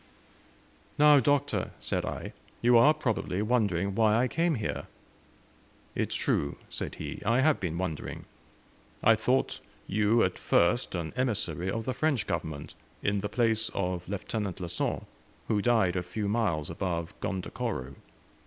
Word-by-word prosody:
"Now, 150 -1 +7
Doctor," 145 +1 +1
said - - -1
I, - - -5 0.3
"you 120 +1 +4
are, 120 +6 +8
probably, 115 -9 -1
wondering 100 -5 +1
why 110 +1 +4
I 125 +3 +3
came 165 +3 +1
here?" 110 - -3 1.1
"It - - -1
is - - -1
true," 70 - 0 0.2
said - - -4
he; - - -6
"I 115 +5 +3
have 155 +2 +3
been 85 -3 -2
wondering. 85 -4 -4 0.8
I 115 - +7
thought 125 +4 +1 0.3
you, 110 +3 +3
at - - -1
first, 90 +6 +2
an 85 -2 -3
emissary 100 - -1
of 110 +3 -2
the 130 - -1
French 140 -2 +1
Government, 80 -3 -4 0.3
in 100 0 +1
the 105 - -3
place 115 0 +1
of 90 -2 -2
Lieutenant 100 -1 -3
Le 90 -2 -4
Saint, 90 - -1 0.4
who 105 -2 +1
died 110 -6 +3
a 90 - +1
few 100 +4 -3
miles 100 -9 0
above 85 -2 -3
Gondokoro. 70 -8 -3
105 Hz, 150 wpm, -29 LUFS, 90-120 Hz, 1.1 s, are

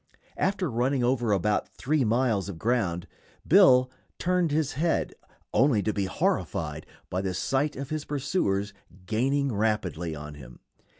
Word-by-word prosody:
After 190 -1 +1
running 125 +3 +1
over 120 -2 +1
about 105 +1 +1
three 150 +1 0
miles 110 -3 +1
of 95 - -6
ground, 95 -5 0 0.4
Bill 130 -9 +6 0.3
turned 180 -1 +1
his 150 -1 0
head, 165 +5 0 0.4
only 125 -7 +3
to 110 - 0
be 100 -2 -1
horrified 80 -4 -2 0.2
by 90 - -1
the 95 -2 -2
sight 135 +9 0
of 140 +2 -6
his 155 -1 -2
pursuers 105 - -1 0.3
gaining 135 +6 0
rapidly 95 -7 -1
on 75 0 -8
him. 65 -4 -12
120 Hz, 140 wpm, -27 LUFS, 95-140 Hz, 0.4 s, Bill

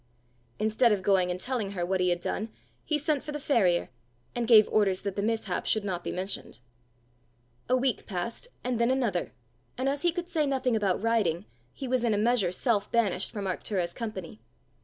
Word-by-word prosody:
Instead 220 +2 +3
of 200 -3 +1
going 185 -2 +3
and 180 0 -2
telling 225 -4 -2
her 175 -3 -1
what 190 +1 0
he 180 0 +2
had 175 0 +1
done, 215 +5 -3 0.3
he 305 - 0
sent 295 -1 0
for 300 - -6
the 295 - -4
farrier, 195 -12 +2 0.4
and 240 -1 -2
gave 220 -3 +8
orders 195 -3 +2
that 200 -2 -3
the 200 - -1
mishap 225 +1 -1
should 215 -2 +1
not 180 -3 -3
be - - -3
mentioned. 185 -7 -5 1.1
A 255 - +4
week 255 -1 0
passed, 205 - -4 0.2
and 245 -2 -1
then 235 +1 +3
another; 240 -9 0 0.5
and 260 +2 -1
as 280 +1 0
he 345 - +3
could 350 +1 -4
say 310 -4 0
nothing 260 -3 +1
about 200 -2 0
riding, 210 -6 +1 0.3
he 270 - -6
was 255 -1 +1
in 225 -3 +2
a - - 0
measure 215 -4 +2
self 210 +1 0
banished 200 -5 +2
from 205 -2 -4
Arctura's 180 -1 -2
company. 190 - -6
215 Hz, 200 wpm, -28 LUFS, 185-250 Hz, 1.1 s, gave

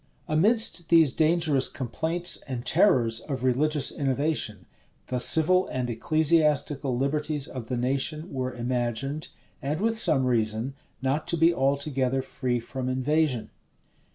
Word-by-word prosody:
Amidst 175 +1 +2
these 160 -6 +5
dangerous 155 -4 +2
complaints 160 +7 -2
and 125 -2 -5
terrors 125 - +3
of 135 -4 -6
religious 140 +3 +1
innovation, 135 - -1 0.4
the 125 - -3
civil 165 +8 +4
and 125 -2 -3
ecclesiastical 150 -1 +1
liberties 150 +1 -1
of 125 -4 -8
the 125 - -3
nation 140 +7 -1
were 130 -1 -2
imagined, 125 +4 -3 0.3
and 150 +4 -2
with 225 +2 0
some 145 -11 +3
reason, 115 +1 -1 0.3
not 135 +4 -1
to 170 - +1
be 165 +2 +4
altogether 135 -2 0
free 125 -2 -2
from 130 +2 -5
invasion. 130 -1 0
135 Hz, 125 wpm, -26 LUFS, 125-155 Hz, 0.4 s, these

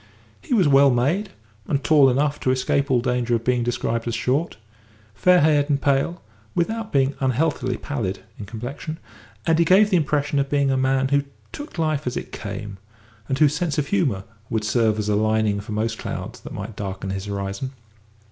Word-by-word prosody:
He 250 - -1
was 190 -8 +4
well 140 0 +6
made, 145 - +1 0.4
and 140 -1 0
tall 145 -4 +6
enough 145 +3 +1
to - - -1
escape 135 +2 +1
all 125 -2 +3
danger 125 -1 0
of 115 - -2
being 125 0 +1
described 115 -1 -1
as 115 - -1
short; 130 +5 -1 0.6
fair 180 - +4
haired 150 -1 +3
and 140 -1 +2
pale, 140 +5 0 0.3
without 220 +5 -1
being 135 0 +2
unhealthily 130 -1 0
pallid, 105 -10 -4 0.2
in 105 - -6
complexion, 125 +8 -6 0.5
and 160 0 +3
he - - +6
gave 195 +5 +5
the 185 - +5
impression 145 -2 0
of 140 0 0
being 140 -2 +2
a - - +2
man 130 0 +1
who 140 0 +3 0.3
took 290 - -8
life 155 -4 0
as 125 - -2
it - - -6
came, 100 -2 -6 0.5
and 135 - 0
whose 150 0 +4
sense 160 -2 -1
of 140 -2 -1
humour 140 - +1 0.3
would 110 -1 -1
serve 110 -1 +2
as 105 -1 -2
a 105 - +2
lining 110 -1 +1
for 105 +2 -9
most 110 +1 -2
clouds - - -5
that - - -10
might 115 - -6
darken 95 -1 -5
his 95 0 -4
horizon. 100 +4 -4
135 Hz, 195 wpm, -23 LUFS, 115-150 Hz, 0.6 s, well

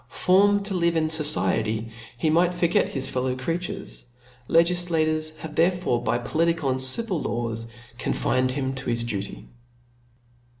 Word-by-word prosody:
Formed 200 +2 +3
to 205 - -4
live 170 -2 +1
in 155 -1 +1
fociety, 115 -8 0 0.3
he 155 +6 +1
might 175 +2 +2
forget 175 -1 +1
his 135 -2 -2
fel 125 - -2
low 130 0 -1
creatures; 165 +7 -5 0.4
legiflatures 165 -2 +2
have 155 0 -8
therefore 170 -7 +1
by 120 - 0
poli 165 +7 0
tical 145 -5 -1
and 130 0 0
civil 180 - +2
laws 115 -1 -3 0.3
confined 130 0 0
him 130 0 -2
to 130 -1 -5
his 115 0 0
duty. 100 -4 -5
155 Hz, 145 wpm, -24 LUFS, 130-170 Hz, 0.4 s, Formed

